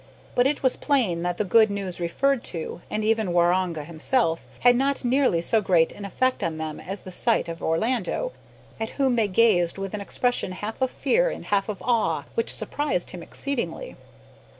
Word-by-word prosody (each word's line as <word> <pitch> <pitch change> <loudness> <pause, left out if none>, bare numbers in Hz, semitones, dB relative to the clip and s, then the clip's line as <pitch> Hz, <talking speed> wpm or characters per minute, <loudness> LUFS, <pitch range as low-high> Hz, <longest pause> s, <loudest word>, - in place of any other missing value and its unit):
But 245 +1 +4
it 285 0 -2
was 260 - +3
plain 230 - +1
that 175 0 -2
the - - +1
good 220 +3 +5
news 195 -3 -4
referred 245 +10 +1
to, 165 +1 -5
and 215 - -2
even 220 -4 +1
Waroonga 175 -2 +2
himself, 165 - 0
had 245 0 +6
not 270 +1 0
nearly 250 -9 +3
so 220 +6 +2
great 175 -5 +3
an 205 - -8
effect 255 +6 0
on 165 -2 -2
them 155 -1 -5
as 195 +2 -6
the 185 - -10
sight 230 +1 +1
of 165 0 -6
Orlando, 225 - 0 0.5
at 220 - -2
whom 270 -3 +3
they 225 -3 +2
gazed 185 -4 +3
with 195 0 -5
an 210 - -3
expression 245 -2 -1
half 210 +6 -6
of 260 - +2
fear - - +2
and - - -7
half 200 0 0
of 205 - -5
awe 235 -3 +1
which 460 0 0
surprised 290 -12 -2
him 180 - -8
exceedingly. 280 - -4
210 Hz, 190 wpm, -25 LUFS, 175-250 Hz, 0.5 s, had